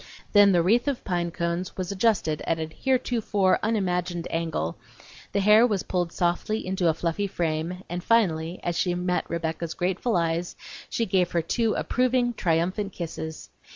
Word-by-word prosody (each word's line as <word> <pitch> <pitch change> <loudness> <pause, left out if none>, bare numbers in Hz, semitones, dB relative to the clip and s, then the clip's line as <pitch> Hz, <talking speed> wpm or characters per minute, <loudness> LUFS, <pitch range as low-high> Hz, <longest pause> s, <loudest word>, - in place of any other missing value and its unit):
Then 205 -1 +7
the 175 -2 +3
wreath 235 +9 +3
of 275 -4 -1
pine 175 -2 -1
cones 170 +1 -3
was 185 0 -3
adjusted 195 -7 +1
at 165 - +1
a 160 - -1
heretofore 215 -1 +1
unimagined 180 -5 -1
angle, 160 - -2 0.5
the 200 - +1
hair 210 +4 +6
was 205 -5 -1
pulled 175 -2 -1
softly 175 +6 -1
into 185 -1 0
a - - +3
fluffy 170 +5 -1
frame, 170 +1 -2
and 175 +1 -4
finally, 175 -7 +1
as 175 - -1
she 175 +1 +1
met 180 0 -1
Rebecca's 165 0 -3
grateful 185 +4 0
eyes 170 +1 -1 0.3
she 230 - 0
gave 185 -3 +2
her 170 -1 +1
two 225 +6 0
approving, 250 -1 +1
triumphant 185 +2 0
kisses. 160 -2 -6
180 Hz, 160 wpm, -26 LUFS, 170-205 Hz, 0.5 s, Then